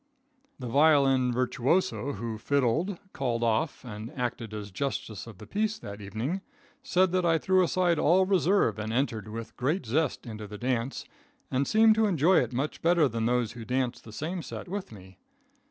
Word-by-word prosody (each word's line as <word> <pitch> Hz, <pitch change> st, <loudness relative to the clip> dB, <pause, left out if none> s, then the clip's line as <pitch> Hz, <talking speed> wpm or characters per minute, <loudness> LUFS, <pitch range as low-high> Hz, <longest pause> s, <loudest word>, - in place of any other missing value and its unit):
The 130 Hz, -, -7 dB
violin 135 Hz, -2 st, +4 dB
virtuoso 130 Hz, +5 st, 0 dB
who 110 Hz, +1 st, -5 dB
"fiddled," 140 Hz, -, +1 dB, 0.2 s
"called 120 Hz, -3 st, -1 dB
off" 130 Hz, +5 st, 0 dB
and 110 Hz, 0 st, -7 dB
acted 120 Hz, -3 st, -3 dB
as 105 Hz, -1 st, -6 dB
justice 110 Hz, -2 st, -4 dB
of 110 Hz, -5 st, -11 dB
the -, -, -11 dB
peace 215 Hz, +1 st, -1 dB
that 100 Hz, 0 st, -9 dB
evening, 110 Hz, -, -3 dB, 0.4 s
said 185 Hz, 0 st, +2 dB
that 185 Hz, 0 st, +1 dB
I 165 Hz, -1 st, +3 dB
threw 185 Hz, +2 st, +3 dB
aside 175 Hz, -2 st, +2 dB
all 180 Hz, +5 st, +4 dB
reserve 185 Hz, -, +2 dB
and 110 Hz, +1 st, -3 dB
entered 115 Hz, -4 st, -1 dB
with 115 Hz, +1 st, -7 dB
great 150 Hz, +8 st, 0 dB
zest 145 Hz, +8 st, 0 dB
into 110 Hz, -2 st, -7 dB
the 105 Hz, +1 st, -8 dB
dance, 125 Hz, +2 st, -2 dB, 0.5 s
and 135 Hz, +2 st, +1 dB
seemed 220 Hz, 0 st, +6 dB
to 220 Hz, 0 st, +2 dB
enjoy 175 Hz, 0 st, +4 dB
it -, -, -1 dB
much 135 Hz, +5 st, -3 dB
better 170 Hz, -2 st, +4 dB
than 115 Hz, -2 st, -1 dB
those 120 Hz, -2 st, +1 dB
who 120 Hz, -1 st, -8 dB
danced 125 Hz, +1 st, -2 dB
in -, -, -12 dB
the -, -, -11 dB
same 170 Hz, +8 st, -3 dB
set -, -, -7 dB
with 195 Hz, -, -5 dB
me. 95 Hz, -3 st, -14 dB
130 Hz, 185 wpm, -28 LUFS, 115-170 Hz, 0.5 s, seemed